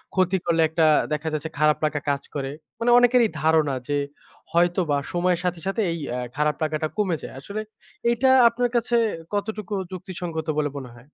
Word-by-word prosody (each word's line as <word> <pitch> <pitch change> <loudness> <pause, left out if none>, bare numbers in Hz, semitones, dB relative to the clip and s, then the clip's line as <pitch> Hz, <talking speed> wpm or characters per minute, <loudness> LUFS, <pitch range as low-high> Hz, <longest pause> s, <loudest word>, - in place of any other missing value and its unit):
ক্ষতি 185 0 +2
করলে 165 -1 +2
একটা 160 0 +2 0.3
দেখা 150 +1 -3
যাচ্ছে 155 +1 -3
খারাপ 150 0 +4
লাগা 150 -1 -1
কাজ 140 -1 0
করে। 135 -1 -3 0.3
মানে 240 +1 +2
অনেকেরই 245 -2 +4
ধারণা 155 -3 +3
যে, 145 - +1 0.6
হয়তোবা 175 -3 +2 0.2
সময়ের 175 0 +1
সাথে, 175 -1 -1
সাথে 205 +3 0
এই 165 - -3 0.2
আ - - -2 0.2
খারাপ 150 0 +1
লাগাটা 155 0 -1
কমে 190 -6 +1
যায়। - - -7
আসলে 200 +10 -5 0.5
এইটা 245 +3 +3 0.2
আপনার 245 +1 -1
কাছে 240 0 +1 0.4
কতটুকু 210 0 -3 0.2
যুক্তিসঙ্গত 175 -3 -5
বলে 145 -2 0
মনে 130 -3 -7
হয়? 120 - -15
170 Hz, 170 wpm, -24 LUFS, 150-205 Hz, 0.6 s, খারাপ